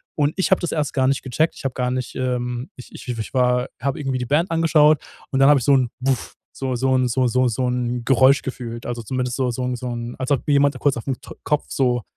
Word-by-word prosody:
Und 145 0 +1
ich 190 - +1
habe 190 - +5
das 175 - -2
erst 150 -3 -1
gar 130 -1 +2
nicht 135 - +1
gecheckt. 155 +5 0
Ich - - -11
habe 130 - -1
gar 125 -1 -1
nicht 125 -1 -4
ähm, 125 0 -2
ich 125 - -12
ich 120 -2 -6
war 125 0 +2
habe 140 +1 -1
irgendwie 135 -3 -2
die 125 - -2
Band 160 +6 +2
angeschaut 155 -2 +4 0.3
und 135 - 0
dann 135 +1 +6
habe 145 -2 +6
ich - - -5
so 140 - +5
'n 125 -3 +2
Buff 130 -1 -1 0.2
so 130 -2 -2
so 130 +1 +1
'n 130 -1 +2
so 125 +1 +1
so 125 +1 +2
so 125 +2 -1
'n 125 -1 -2
Geräusch 135 +1 +5
gefühlt, 120 -3 -6
also, 120 -1 -4
zumindest 125 +1 -2
so 130 -2 +1
so 125 +2 -4
'n 125 0 -1
so 125 +1 -6
'n 120 0 -5
als 130 +1 -3
ob 140 - 0
jemand 145 0 +3
kurz 145 -3 +1
auf 120 - -7
'n 130 - 0
To - - -10
Kopf 150 -1 0
so 125 -3 +1
130 Hz, 260 wpm, -21 LUFS, 125-140 Hz, 0.3 s, dann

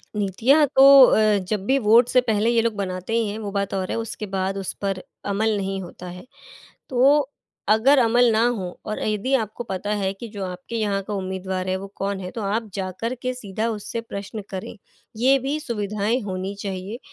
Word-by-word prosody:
नीतियाँ 225 - +3
तो 265 - +7 0.2
अ, 215 -3 +4
जब 195 +1 -3
भी 265 +5 +3
वोट 230 +1 +5
से 255 - +4
पहले 220 -2 +1
ये 235 -1 +3
लोग 230 0 0
बनाते 185 +1 -4
ही 230 -2 +1
हैं 205 - -4
वो 205 -2 -5
बात 200 0 -2
और 190 -1 -2
है - - -1
उसके 225 -1 -4
बाद 195 0 -2
उस 195 -2 -3
पर 195 -2 -2 0.2
अमल 215 +2 +1
नहीं 195 -1 -3
होता 180 0 -10
है। 180 +1 -9 0.7
तो 275 +2 +4 0.4
अगर 245 +7 +5
अमल 240 0 +4
ना 220 +1 +3
हो 190 -7 -4
और 215 - -4
यदि 215 +5 -1
आपको 225 -1 -3
पता 200 -1 -4
है 190 0 0
कि 215 +4 -9
जो 205 -2 -6
आपके 180 +5 -7
यहाँ 205 -3 0
का 210 - -5
उम्मीदवार 190 -1 -3
है 185 - +1
वो 195 +1 -7
कौन 195 0 -2
है 180 -1 -6
तो 225 - -6
आप 215 +2 -2
जाकर 195 +6 -3
के 255 0 -2
सीधा 220 -2 -4
उससे 225 +1 -4
प्रश्न 205 -1 -7
करें, 190 +2 -7 0.4
ये 260 +4 +4
भी 275 +4 -2
सुविधाएँ 215 -2 -1
होनी 190 -1 -4
चाहिए 195 +3 -5
210 Hz, 205 wpm, -23 LUFS, 195-230 Hz, 0.7 s, तो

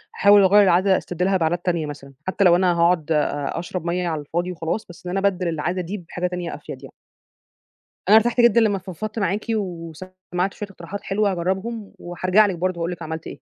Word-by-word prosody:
هاحاول 205 0 +6
أغيّر 205 +2 +6
العادة 190 +1 +4
أستبدلها 180 +2 -1
بعادات 175 +1 -1
تانية 170 -4 0
مثلًا، 140 -2 -9
حتى 195 +2 +1
لو 175 -2 +6
أنا 180 -1 +3
هاقعُد 170 -2 +2
أ 150 0 0
أشرب 175 0 -5
مَيّة 175 +1 -1
على 155 -3 -2
الفاضي 175 +5 -3
وخلاص، 165 +5 -3
بس 175 - -14
إن 180 - -2
أنا 195 +1 +3
أبدّل 185 -2 -1
العادة 170 +3 -2
دي 190 +5 -5
بحاجة 175 0 -4
تانية 180 -1 -4
أفيد - - -10
يعني. - - -11 1.2
أنا 215 - +8
ارتحت 240 +2 +3
جدًا 235 -1 +5
لمّا 205 -3 +2
فضفضت 205 +4 -6
معاكِ 200 +2 -1
وسمعت 185 0 -4
شوية 205 -1 -7
اقتراحات 195 +2 -8
حلوة 200 0 +1
هاجرّبهم، 190 +5 -3
وحارجع 185 +4 +2
لِك 195 - -1
برضه 185 +1 -2
وأقول 170 - -1
لِك 175 - -7
عملت 160 0 -6
إيه. - - -9
180 Hz, 200 wpm, -22 LUFS, 170-195 Hz, 1.2 s, أنا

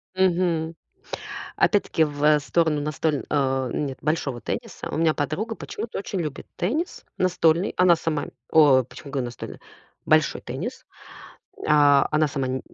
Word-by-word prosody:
Мгм. 175 -3 +1 0.8
Опять-таки 200 -6 +3
в, 145 -1 -5
э, 150 0 +6
сторону 150 +2 +1
настоль 150 0 -1
а, 135 -3 +1
нет, 135 -3 -3
большого 145 -5 -1
тенниса. - - -5
У - - -3
меня 160 -1 +3
подруга 170 +11 -2
почему-то 225 +1 -6
очень 195 -1 -3
любит 150 -4 -5
теннис. 300 - -2
Настольный. 175 -1 +2
Она 180 -1 +5
сама 160 -2 -2 0.2
о, 145 -5 +6
почему 140 +4 -11
говорю 130 -3 -1
настольный? 120 -1 -8 0.5
Большой - - +3
теннис. - - -6 0.8
А, 145 -2 +5
она 155 0 +2
сама 130 -2 -2
155 Hz, 135 wpm, -24 LUFS, 140-170 Hz, 0.8 s, э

